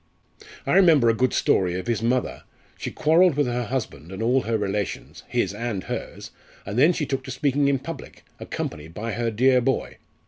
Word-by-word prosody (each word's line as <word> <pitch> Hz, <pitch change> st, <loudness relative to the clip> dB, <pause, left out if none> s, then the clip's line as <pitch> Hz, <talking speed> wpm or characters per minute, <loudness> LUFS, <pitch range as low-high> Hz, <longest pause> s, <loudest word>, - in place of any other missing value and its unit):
I -, -, 0 dB
remember 165 Hz, -10 st, +6 dB
a -, -, +4 dB
good 125 Hz, +2 st, +1 dB
story 90 Hz, -2 st, +2 dB
of 95 Hz, -, -5 dB
his 115 Hz, -2 st, -1 dB
mother 125 Hz, +2 st, 0 dB, 0.3 s
she -, -, -5 dB
quarrelled 165 Hz, +1 st, +3 dB
with 145 Hz, -, +3 dB
her 120 Hz, 0 st, -2 dB
husband 105 Hz, -, -4 dB
and 95 Hz, +3 st, -4 dB
all 125 Hz, +3 st, +3 dB
her 115 Hz, 0 st, -1 dB
relations, 100 Hz, -1 st, -3 dB
his 95 Hz, -, 0 dB
and 110 Hz, -3 st, -3 dB
hers, -, -, -6 dB, 0.3 s
and 100 Hz, -, -5 dB
then 155 Hz, +6 st, +6 dB
she 160 Hz, -3 st, -2 dB
took 135 Hz, -1 st, -3 dB
to -, -, -8 dB
speaking 140 Hz, +2 st, +1 dB
in 140 Hz, -1 st, +3 dB
public, -, -, -9 dB, 0.2 s
accompanied 75 Hz, +3 st, -6 dB
by 115 Hz, +3 st, -4 dB
her 115 Hz, +2 st, -1 dB
dear 125 Hz, +3 st, +3 dB
boy. 130 Hz, +1 st, -1 dB
120 Hz, 195 wpm, -24 LUFS, 105-135 Hz, 0.3 s, remember